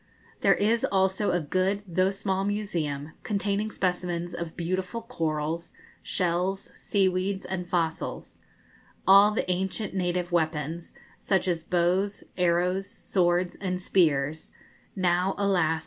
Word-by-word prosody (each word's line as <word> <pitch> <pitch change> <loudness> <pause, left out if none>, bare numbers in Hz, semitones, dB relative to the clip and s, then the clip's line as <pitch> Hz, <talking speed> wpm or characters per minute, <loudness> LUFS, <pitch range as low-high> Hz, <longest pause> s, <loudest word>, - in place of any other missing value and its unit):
There - - +4
is 225 +3 +2
also 190 +1 +1
a 175 - +2
good, 185 +6 0
though 185 +2 +2
small 195 -1 -1
museum, 170 -8 -2
containing 205 0 -1
specimens 180 -3 -2
of 170 -2 -6
beautiful 185 +6 -2
corals, 165 -6 -3 0.3
shells, 180 +2 -1
seaweeds, 190 0 0
and 180 -1 -4
fossils; 165 -2 -2 0.7
all 200 +2 +8
the 210 - -1
ancient 190 +3 -2
native 180 -1 -1
weapons, 160 0 -1 0.2
such 190 -1 +1
as 170 -3 0
bows, 180 +4 +1
arrows, 180 +2 +1
swords, 175 -1 0
and 185 -2 -2
spears 155 -5 +1 0.4
now, 180 0 +1
alas! 175 -5 +2
180 Hz, 115 wpm, -27 LUFS, 170-195 Hz, 0.7 s, all